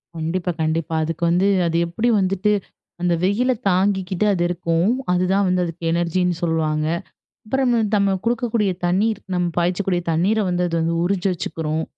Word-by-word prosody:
கண்டிப்பா, 170 +3 -2
கண்டிப்பா. 160 0 -1
அதுக்கு 165 +2 -4
வந்து 180 +3 +3 0.2
அது 165 0 0
எப்டி 220 +8 -1
வந்துட்டு, 195 +2 +1 0.5
அந்த 175 -1 +2
வெயில 225 +7 +2 0.2
தாங்கிக்கிட்டு 190 0 +1
அது 175 -2 0
இருக்கும், 175 +2 0 0.2
அதுதான் 185 +2 +2
வந்து 180 0 +1
அதுக்கு 170 0 -8
எனர்ஜினு 175 +1 0
சொல்வாங்க. 155 -2 0 0.6
அப்பறம் 255 +2 +1 0.2
நம்ம 200 -1 +2
குடுக்கக்கூடிய 230 -3 +1
தண்ணீர் 200 +4 +1
நம்ம 180 -1 +1
பாய்ச்சக்கூடிய 180 +1 0
தண்ணீர 190 +7 +2
வந்து 180 0 0
அது 170 - -3
வந்து 165 +1 0
உறிஞ்சி 185 +1 0
வச்சுக்குறும். 160 -2 -3
180 Hz, 145 wpm, -21 LUFS, 170-200 Hz, 0.6 s, வந்து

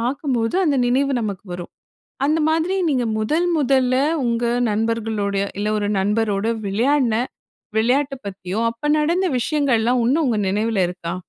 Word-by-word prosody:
பார்க்கும்போது 250 +1 -1
அந்த 290 -4 +2
நினைவு 270 +3 +1
நமக்கு 205 -4 -4
வரும். 175 0 -7 0.5
அந்த 305 +3 +2
மாதிரி 325 +4 +1
நீங்க 255 -4 +1
முதல் 310 +11 +1
முதல்ல 260 -2 +2 0.3
உங்க 235 0 0 0.3
நண்பர்களோடயோ, 210 -2 -1
இல்ல 210 - -1
ஒரு 205 - -1
நண்பரோடு 210 +1 0 0.2
விளையாடுன 240 +4 +1 0.6
விளையாட்ட 270 +5 +2
பத்தியோ, 190 +1 -5
அப்ப 235 +6 -5
நடந்த 340 +5 +1
விஷயங்கள்லாம் 250 -3 +1
இன்னும் 275 +8 +2
உங்க 235 - +1
நினைவுல 210 +1 0
இருக்கா? 175 -1 -5
235 Hz, 135 wpm, -21 LUFS, 210-280 Hz, 0.6 s, அந்த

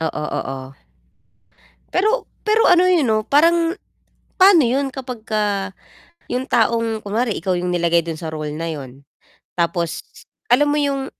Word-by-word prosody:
Oo, 160 -1 -3
oo, 135 0 -3 1.3
pero 435 +5 +1 0.2
pero 440 +2 +4
ano 360 +1 +5
eh 350 -5 +3
'no, 220 -2 0
parang 335 +3 +3 0.6
pano 375 -2 +7
yun 270 +2 -1
kapag 250 -4 -7 1.1
yung 255 +1 -2
taong 225 -2 +1
kunware 220 +3 -1
ikaw 185 0 -2
yung 180 0 -2
nilagay 170 -1 +2
dun 165 -2 -5
sa 160 - -5
role 155 -1 -5
na 165 +2 -4
yun? 135 -3 -8 0.5
tapos 170 -1 -1 0.5
alam 285 +4 +5
mo 290 - +1
yung 275 -2 -1
225 Hz, 140 wpm, -20 LUFS, -, 1.3 s, pano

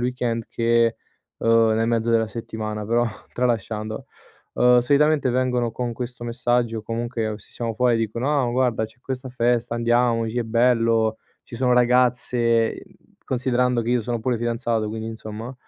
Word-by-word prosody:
weekend, 120 -2 -1
che, 115 0 +2 0.4
uhm, 115 -1 +3
nel 115 +1 +1
mezzo 115 -1 0
della 115 -1 +2
settimana 110 -2 -5
però, 120 +1 +2 0.3
tralasciando. 110 -3 -2 0.5
Uhm, 125 0 +5
solitamente 145 +2 +3
vengono 125 -1 0
con 120 +1 -3
questo 120 0 -6
messaggio, 120 -1 0
o - - -7
comunque 115 -1 -3
se 100 - -16
siamo 115 -2 -3
fuori 120 0 +2
dicono: 120 +6 0
"Ah 120 - 0
guarda 120 -3 +1
c'è 110 +3 -13
questa 130 0 -5
festa, 120 -1 0
andiamoci, 115 -1 +1
è 120 - +1
bello, 115 -1 +2 0.3
ci - - -11
sono 125 0 +2
ragazze," 120 -2 +2
ehm, - - -11 0.4
considerando 125 -1 +1
che 115 - -2
io 125 0 +2
sono 120 +1 -3
pure 120 +1 0
fidanzato, 115 -1 -1
quindi 110 +1 -5
insomma, 110 +2 -7
120 Hz, 155 wpm, -23 LUFS, 115-125 Hz, 0.5 s, Uhm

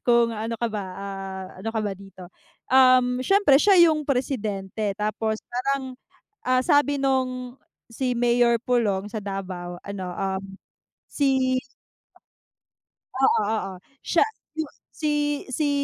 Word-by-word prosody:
kung 235 -1 +4
ano 225 +1 -3
ka 235 - -1
ba, 205 -2 -3
ah, 195 -1 -6
ano 225 - -4
ka 225 -1 -1
ba 200 - -1
dito? 190 -2 -12 0.4
Uhm, 255 -1 +5
siyempre 305 -3 +4
siya 400 -2 +5
yung 305 -2 -2
presidente 215 -6 -2
tapos 215 +1 -1 0.2
parang, 260 +1 -1 0.5
ah 255 0 +3
sabi 290 +1 +3
nung 255 -2 -1 0.3
si 250 0 -1
Mayor 240 0 +3
Pulong 210 -5 0
sa 215 - -3
Davao 185 -3 -5
ano, 200 -2 -5
um, 195 0 -2 0.7
si 265 -2 +2 1.6
Oo, 265 -4 +4
oo. 215 -3 -2 0.3
Siya 340 - +3 0.4
yung 310 -2 -2 0.2
si-si 295 -1 -1
240 Hz, 120 wpm, -24 LUFS, 200-265 Hz, 1.6 s, Uhm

